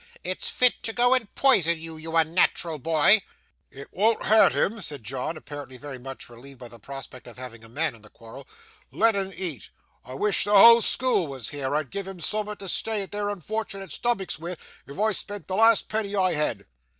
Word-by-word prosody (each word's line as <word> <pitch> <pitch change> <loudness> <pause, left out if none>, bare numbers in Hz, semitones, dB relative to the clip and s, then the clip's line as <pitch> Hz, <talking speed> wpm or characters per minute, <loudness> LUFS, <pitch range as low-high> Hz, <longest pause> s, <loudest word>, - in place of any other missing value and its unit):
It's 470 - -3
fit 250 - +3
to 225 - -4
go 245 +1 +3
and 240 -6 -1
poison 170 - +4
you, 165 0 -8
you 160 +1 -8
unnat'ral 165 -1 +1
boy.' 165 +7 +4 0.5
'It 140 +1 -11
wean't 220 +4 +1
hurt 220 0 +6
him,' 220 +1 -1
said 145 - -5
John, 135 +7 -4
apparently 145 -4 -9
very 135 -1 -9
much 135 +1 -8
relieved 130 +3 -14
by 120 -1 -11
the 115 0 -14
prospect 135 +1 -10
of 120 - -13
having 120 -3 -9
a 115 - -14
man 155 +5 -1
in 115 - -16
the 105 - -16
quarrel; 115 +6 -13 0.4
'let' 225 -1 +2
un 195 -1 -2
eat. 170 - -6 0.3
I 125 +2 -9
wish 210 +8 +1
the 205 0 +4
whole 230 +3 +9
school 240 -8 +2
was 130 -5 -6
here. 145 -1 -3
I'd 150 -4 -2
give'em 195 -2 -6
soom'at 210 +3 -3
to 195 - -9
stay 210 +2 -1
their 205 +1 -4
unfort'nate 200 0 -5
stomachs 195 -10 -1
wi', 170 +2 -6 0.3
if 140 +6 -10
I 220 +1 +2
spent 205 0 -6
the 185 - -2
last 225 +1 +4
penny 210 -2 -2
I 185 -2 +2
had! 135 -10 -1
170 Hz, 200 wpm, -25 LUFS, 135-210 Hz, 0.5 s, whole